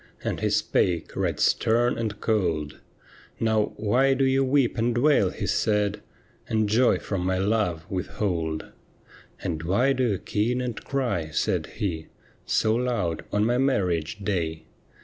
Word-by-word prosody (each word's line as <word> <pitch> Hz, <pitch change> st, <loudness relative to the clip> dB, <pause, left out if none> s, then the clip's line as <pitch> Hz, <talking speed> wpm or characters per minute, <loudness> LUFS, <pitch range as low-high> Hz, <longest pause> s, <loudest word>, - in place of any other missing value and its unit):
And -, -, -2 dB
he -, -, 0 dB
spake 85 Hz, -3 st, 0 dB
right -, -, -1 dB
stern 120 Hz, +2 st, +2 dB
and 110 Hz, -3 st, -3 dB
cold: 85 Hz, -10 st, -1 dB, 0.6 s
'Now, 110 Hz, -2 st, +1 dB
why 125 Hz, +6 st, +2 dB
do 135 Hz, 0 st, +2 dB
you 135 Hz, +1 st, +3 dB
weep 135 Hz, -2 st, +2 dB
and 120 Hz, 0 st, 0 dB
wail,' 135 Hz, -7 st, +4 dB
he -, -, -5 dB
said, 105 Hz, -1 st, +1 dB, 0.2 s
' -, -, -31 dB
And 110 Hz, -1 st, +1 dB
joy 120 Hz, +5 st, +3 dB
from 95 Hz, -3 st, -3 dB
my 95 Hz, 0 st, 0 dB
love 95 Hz, -5 st, 0 dB
withhold? 85 Hz, -4 st, -2 dB, 0.4 s
' -, -, -24 dB
And 80 Hz, -2 st, -2 dB
why 100 Hz, +11 st, +2 dB
do 130 Hz, -1 st, +1 dB
you 100 Hz, -, 0 dB
keen 115 Hz, +7 st, -1 dB
and 120 Hz, -4 st, -4 dB
cry,' 120 Hz, -, -1 dB
said 75 Hz, -, -1 dB
he, 85 Hz, -7 st, -3 dB, 0.2 s
' -, -, -33 dB
So 110 Hz, -, +2 dB
loud 115 Hz, -8 st, -1 dB
on 105 Hz, +1 st, +1 dB
my 120 Hz, +2 st, +1 dB
marriage 90 Hz, -, 0 dB
day 80 Hz, -5 st, -2 dB
105 Hz, 160 wpm, -25 LUFS, 90-120 Hz, 0.6 s, wail